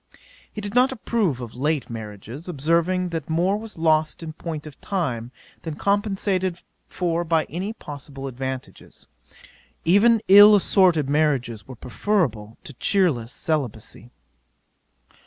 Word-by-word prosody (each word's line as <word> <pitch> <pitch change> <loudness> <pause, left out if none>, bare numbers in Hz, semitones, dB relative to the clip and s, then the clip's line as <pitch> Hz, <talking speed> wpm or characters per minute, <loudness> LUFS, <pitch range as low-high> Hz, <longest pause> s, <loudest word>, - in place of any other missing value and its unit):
'He 210 - -6
did 205 0 -5
not 250 +2 +4
approve 215 - -1
of 115 -2 -7
late 145 +1 -1
marriages, 115 - -8
observing 170 +4 +1
that 165 -3 -5
more 175 +5 +1
was 215 -2 -8
lost 160 0 +1
in 160 -1 -6
point 155 -2 -6
of 150 -3 -12
time, 125 - -3 0.3
than 160 -2 -5
compensated 195 -2 0 0.3
for 170 -1 -1
by 165 -1 +1
any 185 +6 -3
possible 140 - -9
advantages. 130 0 -7 0.8
Even 215 +7 +5
ill 205 +2 +9
assorted 180 -7 +3
marriages 140 -7 0
were 130 - -9
preferable 115 - -2
to 145 - -10
cheerless 135 - +1
celibacy. 120 -7 -4
160 Hz, 125 wpm, -23 LUFS, 130-190 Hz, 0.8 s, ill